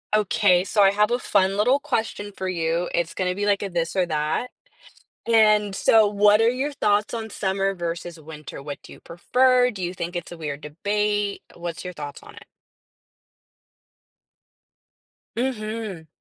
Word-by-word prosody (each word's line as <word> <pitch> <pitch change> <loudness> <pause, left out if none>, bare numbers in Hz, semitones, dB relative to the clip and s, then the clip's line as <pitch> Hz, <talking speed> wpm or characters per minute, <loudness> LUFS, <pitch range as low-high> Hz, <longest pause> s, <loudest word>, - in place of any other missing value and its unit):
Okay, 195 -3 +3
so 205 +2 +1
I 195 - +6
have 210 +1 +2
a 245 - +2
fun 195 -4 +1
little 250 +7 +3
question 225 -7 -3
for 190 - -3
you, 170 -1 -1
it's 170 0 -1
gonna 180 -1 0
be 205 +2 -2
like 205 -1 +2
a 200 - -3
this 170 -1 -2
or 185 -2 +2
that. 155 +10 -1 0.8
And, 215 -3 +4
so, 220 +1 +5
what 205 +1 +4
are 225 - +4
your 265 +4 -1
thoughts 210 -6 +1
on 225 -1 -4
summer 195 -1 -1
versus 170 -1 -5
winter? 150 -2 -10
What 145 0 -6
do - - -12
you - - -17
prefer? 250 +8 +2
Do 200 -5 -8
you 175 0 -2
think 175 -1 -5
it's 175 - -5
a 175 - -9
weird 150 -2 -5
debate? 205 +6 -1
What's 170 0 -6
your 180 - -5
thoughts 145 -4 -8
on - - -14
it? - - -14 2.9
Mhm. 215 -8 -3
195 Hz, 165 wpm, -23 LUFS, 170-215 Hz, 2.9 s, I